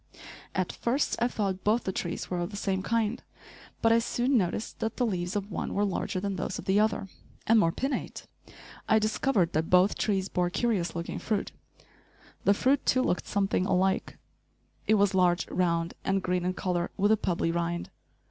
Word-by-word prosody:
At 185 -1 0
first 260 +5 0
I 240 - +4
thought 195 -5 -2
both 220 +3 +2
the 190 - -1
trees 175 -2 -4
were 180 - -1
of 175 +1 -2
the 205 - -7
same 190 -2 -1
kind, 230 +3 0 0.6
but 225 - +5
I 230 - +5
soon 245 +3 0
noticed 205 0 -1
that 225 0 -3
the 250 - +2
leaves 180 -3 -2
of 205 0 -3
one - - -3
were 205 - +2
larger 190 -1 -2
than 195 0 -3
those - - -3
of - - -8
the 195 +2 +3
other, 215 -2 +1 0.4
and 225 0 +5
more 165 -5 +3
pinnate. 270 +10 -3 0.6
I 220 - +6
discovered 215 -4 +1
that 160 +1 0
both 180 +2 +4
trees 195 -2 0
bore 180 -2 0
curious 195 -3 0
looking 170 0 -4
fruit. 215 -3 -2 0.9
The 200 - +5
fruit, 265 +6 +2
too, 255 0 +2
looked 180 - -1
something 195 -2 0
alike. 190 0 +1 0.7
It 220 - +5
was 200 -2 +3
large, 180 -2 +2
round, 170 -2 0
and 195 -1 0
green 180 -1 0
in 185 0 -1
color, 175 -2 -1
with 205 +2 +3
a - - +7
pebbly 170 -4 0
rind. 170 0 -2
195 Hz, 190 wpm, -28 LUFS, 180-220 Hz, 0.9 s, a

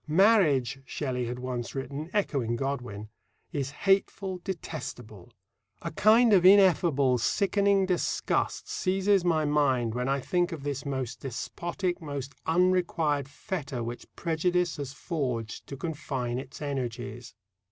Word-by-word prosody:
"Marriage," 155 - +4
Shelley 130 -3 -3
had 120 +1 -4
once 125 -1 -4
written, 140 +4 -4
echoing 135 - 0
Godwin, 120 -5 -4 0.4
"is 140 -5 -2 0.2
hateful, 195 -1 +1
detestable. 125 - -7 0.5
A - - -3
kind 215 +5 +5
of 185 -3 +6
ineffable, 170 -9 +5
sickening 200 - +2
disgust 180 -2 0
seizes 195 +1 +2
my 160 -3 +2
mind 135 -6 +2
when 125 +2 -1
I 140 0 +1
think 175 +6 0
of 160 -4 -6
this 140 -1 -3
most 130 -3 -3
despotic, 175 - -3
most 140 -3 -5
unrequired 165 -5 +2
fetter 140 - -4
which 120 +1 -6
prejudice 175 +1 0
has 140 -2 -4
forged 130 - -3
to 140 - -7
confine 135 -6 -3
its 135 +2 -8
energies." 125 -4 -4
145 Hz, 125 wpm, -28 LUFS, 130-180 Hz, 0.5 s, of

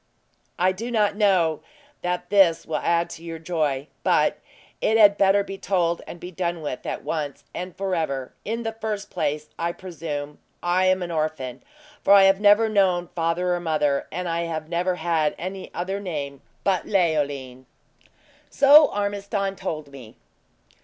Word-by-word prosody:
"I 185 +1 +3
do 220 +6 -5
not 210 -4 +1
know 185 -7 +2 0.4
that 180 0 -3
this 190 -5 +4
will 160 - -2
add 170 0 +1
to 165 - -10
your 165 -1 -6
joy; 155 -4 -1 0.2
but - - +2 0.4
it 220 - +3
had 205 -2 +7
better 200 0 +4
be 195 -1 -8
told 175 -3 0
and 175 - -8
be 180 - -8
done 170 -2 -3
with, 135 -4 -5
at - - -4
once 150 -4 -4
and 180 0 -6
forever. 160 -9 -2
In 230 +2 -3
the 225 - -2
first 215 -2 -5
place, 150 +1 -2
I 170 +1 -1
presume 150 -5 -6 0.2
I 180 +2 +2
am 185 0 +2
an 175 - -5
orphan, 155 -6 -3 0.4
for 200 - +6
I 200 -1 +8
have 195 +1 +4
never 205 +2 +6
known 185 -5 +2
father 170 +2 0
or 175 - -1
mother, 150 -4 0
and 180 +2 -3
I 170 0 -1
have 160 -2 -4
never 175 +2 0
had 165 -4 0
any 185 +2 -6
other 190 +3 -3
name 145 -8 -5 0.2
but 190 -2 0
Leoline." 145 - 0 0.8
"So 290 +2 +7
Ormiston 200 -1 -2
told 155 -5 -5
me." 125 -6 -12
175 Hz, 165 wpm, -24 LUFS, 155-195 Hz, 0.8 s, I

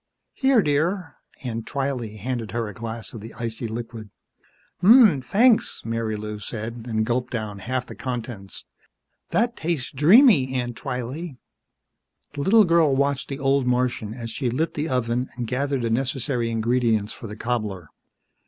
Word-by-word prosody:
"Here, 265 -5 +3
dear." 160 +4 0 0.3
Aunt 115 -3 -4
Twylee 130 -6 -3
handed 115 -1 -4
her 115 -1 -1
a 105 - -7
glass 115 +1 -6
of 115 - -8
the 115 +2 -10
icy 115 0 -4
liquid. 115 -1 -6 0.7
"Ummm, 205 - +7
thanks," 225 - +3
Marilou 110 -2 -3
said, 115 +2 -6
and 110 -1 0
gulped 125 +1 -1
down 110 -4 -4
half 125 +5 -2
the - - -9
contents. 120 -6 -6 0.6
"That 240 +1 +1
tastes 160 -5 -2
dreamy, 150 - +6
Aunt 120 -2 -2
Twylee." 135 +5 -5 1.0
The 145 - -4
little 215 +8 +6
girl 165 -5 +4
watched 140 0 0
the 135 - -4
old 135 -1 +1
Martian 125 -3 0
as 115 -2 -6
she 125 +1 -2
lit 155 +7 -1
the 150 +2 -2
oven 125 0 0
and 120 -1 -3
gathered 135 +2 -1
the 115 - 0
necessary 125 0 -1
ingredients 115 -2 +1
for 115 - -9
the 105 - -7
cobbler. 105 -9 -3
125 Hz, 155 wpm, -24 LUFS, 115-140 Hz, 1.0 s, Ummm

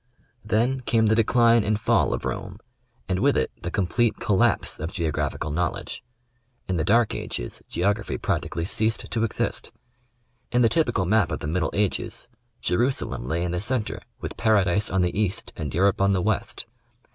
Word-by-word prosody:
Then 115 +5 +1
came 115 -3 +2
the 110 0 +4
decline 115 0 +4
and 105 +1 0
fall 110 - +2
of - - -3
Rome, 100 -1 -4 0.5
and 95 -1 0
with - - +3
it - - 0
the 90 - -3
com 95 +1 0
plete 120 +5 +1
collapse 100 -3 +1
of 80 +3 -4
geographical 75 -4 -2
knowledge. 85 +2 -3 0.6
In 95 - -1
the 80 - 0
dark 115 +6 +3
ages, - - -4
geography 100 +4 0
practically 85 - -2
ceased 110 +3 0
to 115 - 0
exist. 115 - -1 0.8
In 120 0 +3
the 115 - +5
typical 120 - +2
map 100 -2 +3
of - - -2
the - - -4
middle 80 +1 0
ages, 100 -2 -1 0.3
Jerusalem 120 - 0
lay 85 +5 -1
in 90 - -2
the 90 - -1
centre 115 0 -2 0.2
with - - -6
Paradise 100 -2 +2
on 95 0 +1
the 90 - -1
East 105 +2 -1
and 75 -4 -4
Europe 95 +5 +2
on 100 0 +4
the 95 - +1
West. 110 +1 -1
100 Hz, 175 wpm, -25 LUFS, 90-110 Hz, 0.8 s, the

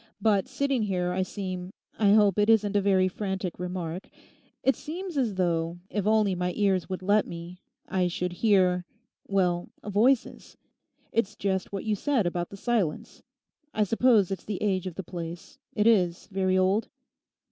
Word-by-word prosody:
But 205 -2 +2
sitting 270 -1 0
here 180 -3 -1
I 185 +1 0
seem, 185 -1 -4 0.3
I 205 -2 +5
hope 210 -2 +4
it 210 +1 +3
isn't 210 -2 +3
a 205 - +4
very 190 -1 +3
frantic 190 -2 -4
remark, 180 -1 -4 0.5
it 270 - +3
seems 345 +3 -6
as 240 -8 0
though, 170 -2 0
if 205 -1 -1
only 215 -2 +3
my 180 0 -2
ears 195 -4 +1
would 185 -1 -4
let 205 +2 +3
me, 175 +2 -8 0.3
I 185 -1 +1
should 180 0 -3
hear—well, 185 -2 0
voices. 225 +5 +1 0.5
It's 215 -2 0
just 190 -2 -2
what 195 -1 -4
you 215 - +1
said 240 +1 +1
about 175 0 -2
the 200 - -10
silence. 205 -8 -2 0.5
I 215 - +3
suppose 225 -2 +3
it's 195 - -4
the 205 -3 -3
age 190 -3 0
of 180 - -6
the 190 - -5
place; 170 -1 -8 0.2
it 210 - +2
is 180 -7 +3
very 190 -1 +1
old? 190 +4 +2
195 Hz, 165 wpm, -27 LUFS, 180-215 Hz, 0.5 s, I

